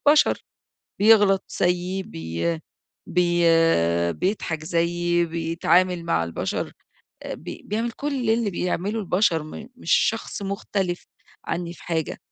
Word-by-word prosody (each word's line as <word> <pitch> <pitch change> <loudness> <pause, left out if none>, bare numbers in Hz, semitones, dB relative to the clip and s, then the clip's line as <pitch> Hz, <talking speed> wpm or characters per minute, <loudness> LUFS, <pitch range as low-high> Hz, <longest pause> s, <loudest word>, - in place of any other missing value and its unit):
بشر، 300 +1 +4 0.6
بيغلط 205 -3 +6 0.2
زيي، 180 +2 +1
بي 85 - -3 0.5
بي 175 -1 +2 0.7
بيضحك 165 - -2
زيي، 175 +1 +1
بيتعامل 170 +2 +1
مع 85 - +1
البشر، 85 - -3 0.6
بي - - -7
بيعمل 225 +3 -1
كل 270 -2 -2
اللي 225 -1 +2
بيعمله 185 +4 -1
البشر، 180 -4 +2
م 215 +9 -9
مش 170 - -4
شخص 225 -1 +1
مختلف 195 -2 -2 0.4
عني 170 -1 -3
في - - -15
حاجة، 160 -2 -2
180 Hz, 110 wpm, -24 LUFS, 170-205 Hz, 0.7 s, بيغلط